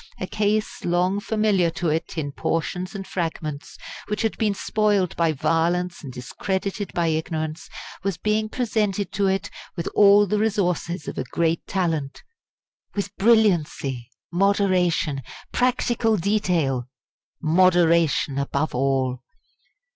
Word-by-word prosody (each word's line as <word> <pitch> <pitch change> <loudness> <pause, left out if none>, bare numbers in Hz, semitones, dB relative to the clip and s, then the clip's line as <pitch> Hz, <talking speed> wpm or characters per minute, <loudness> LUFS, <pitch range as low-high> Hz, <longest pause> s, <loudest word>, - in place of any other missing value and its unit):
A - - -2
case 215 +2 -1
long 180 +3 +1
familiar 210 -5 +2
to 165 0 -2
it 160 +2 -2
in 145 -3 -2
portions 180 +6 -2
and 195 -1 -5
fragments, 155 -5 -4 0.3
which 210 +2 -2
had 225 - 0
been 210 -2 +1
spoilt 205 -4 +1
by 165 -1 +2
violence 170 +4 0
and 135 - -7
discredited 190 - -3
by 170 - +1
ignorance, 160 0 -3 0.3
was 195 -3 -2
being 215 +2 0
presented 215 -4 -1
to 200 0 +1
it 190 -1 -1 0.2
with 170 - -4
all 205 0 +7
the 210 +2 0
resources 180 -6 -1
of - - -4
a - - -1
great 165 +5 -1
talent 165 -7 -2 0.7
with 200 0 -3
brilliancy, 170 - +2 0.2
moderation, 180 -6 +2 0.3
practical 240 -3 +1
detail 170 - 0 0.5
moderation 170 -4 +3
above 140 +2 -1
all! 130 -1 0
180 Hz, 125 wpm, -23 LUFS, 160-205 Hz, 0.7 s, all